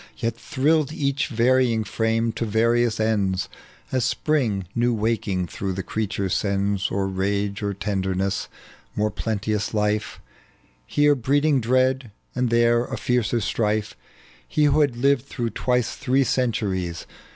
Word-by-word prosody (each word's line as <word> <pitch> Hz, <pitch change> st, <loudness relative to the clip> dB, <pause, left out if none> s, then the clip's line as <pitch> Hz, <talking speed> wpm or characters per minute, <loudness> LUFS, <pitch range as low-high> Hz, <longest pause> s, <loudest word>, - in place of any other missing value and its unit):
Yet 115 Hz, 0 st, -2 dB
tJu 130 Hz, +2 st, -7 dB
illed 155 Hz, -1 st, +3 dB
each 140 Hz, -2 st, -1 dB
varying 120 Hz, -1 st, +2 dB
frame 115 Hz, +1 st, 0 dB
to 115 Hz, -, -4 dB
various 115 Hz, +1 st, +2 dB
ends, 100 Hz, -4 st, +1 dB, 0.4 s
As 130 Hz, -2 st, +1 dB
Spring 115 Hz, -13 st, 0 dB
new 120 Hz, 0 st, +1 dB
waking 105 Hz, -4 st, -1 dB
through 95 Hz, +2 st, -4 dB
the 95 Hz, +1 st, -4 dB
creature 100 Hz, -2 st, -2 dB
sends 100 Hz, 0 st, 0 dB
Or 95 Hz, 0 st, -1 dB
rage 100 Hz, +2 st, -1 dB
or 100 Hz, -1 st, -2 dB
tenderness; 95 Hz, -1 st, -1 dB, 0.5 s
more 105 Hz, 0 st, 0 dB
plenteous 105 Hz, 0 st, -2 dB
life 105 Hz, 0 st, 0 dB, 0.7 s
Here 145 Hz, -, +4 dB
breeding 140 Hz, +2 st, +2 dB
dread, 130 Hz, +1 st, +1 dB, 0.2 s
and 125 Hz, -1 st, 0 dB
there 120 Hz, +1 st, +3 dB
a -, -, -5 dB
fiercer 120 Hz, -1 st, 0 dB
strife. 105 Hz, 0 st, -1 dB, 0.5 s
He 150 Hz, -, +1 dB
who 150 Hz, +1 st, +4 dB
had 140 Hz, -5 st, +2 dB
lived 135 Hz, +1 st, +2 dB
through 120 Hz, -5 st, -3 dB
twice 125 Hz, -1 st, 0 dB
thjee 130 Hz, +2 st, +2 dB
centuries. 95 Hz, -9 st, -1 dB
115 Hz, 140 wpm, -23 LUFS, 100-125 Hz, 0.7 s, Here